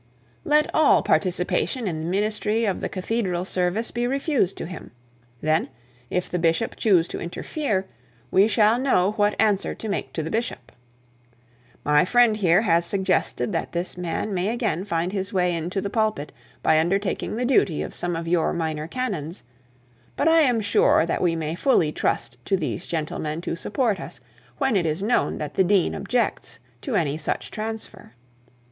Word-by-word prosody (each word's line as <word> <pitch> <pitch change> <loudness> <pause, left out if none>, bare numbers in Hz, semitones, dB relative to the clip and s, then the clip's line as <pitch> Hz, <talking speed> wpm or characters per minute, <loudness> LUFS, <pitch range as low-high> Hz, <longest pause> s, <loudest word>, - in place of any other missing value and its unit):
Let 300 0 +3
all 310 -2 +5
participation 185 +6 0
in 160 -4 -2
the 160 - -4
ministry 210 +4 0
of 195 -3 -1
the - - -2
cathedral 185 -2 -2
service 185 +5 0
be 240 0 -1
refused 270 - 0
to - - -4
him. 180 +2 -8 0.5
Then, 155 +1 +1 0.4
if 180 - -1
the 180 - -2
bishop 165 +6 +1
choose 180 -6 +3
to - - -5
interfere, 195 - -2 0.5
we 195 +2 +5
shall 220 +2 +3
know 205 -8 +2
what 205 -1 0
answer 205 -2 +2
to 220 - -6
make 200 - -3
to 160 - -2
the 160 - -5
bishop. 225 - -3 1.1
My 150 0 +5
friend 240 +2 +4
here 190 -1 +3
has 170 -4 +3
suggested 190 +2 0
that 165 - -3
this 175 +1 -2
man 180 +4 -3
may 185 +1 0
again 220 -6 -1
find 175 -1 -1
his 195 0 -3
way 180 -2 +2
into 170 +4 -2
the 200 - -3
pulpit 215 -10 0 0.3
by 155 - +4
undertaking 195 +6 -1
the 245 +2 -1
duty 215 - +2
of - - -7
some 175 -1 -2
of 165 0 -4
your 170 -1 +1
minor 160 -2 -2
canons; 185 - -4 0.7
but 290 - +1
I 325 0 +6
am 250 -7 +3
sure 200 -5 +3
that 170 - -2
we 170 -2 +2
may 160 -1 -3
fully 170 - +2
trust - - -2
to 195 - +1
these 175 +1 -4
gentlemen 155 -1 -3
to 170 - -3
support 205 +3 -1
us, - - -8 0.4
when 270 -5 +1
it 175 -4 +2
is 160 +5 -2
known 235 +3 +1
that 150 -2 -5
the 190 - +3
dean 190 0 +2
objects 245 -3 -1 0.2
to - - -3
any 155 -2 0
such - - -2
transfer.' 220 - -6
190 Hz, 175 wpm, -24 LUFS, 170-220 Hz, 1.1 s, I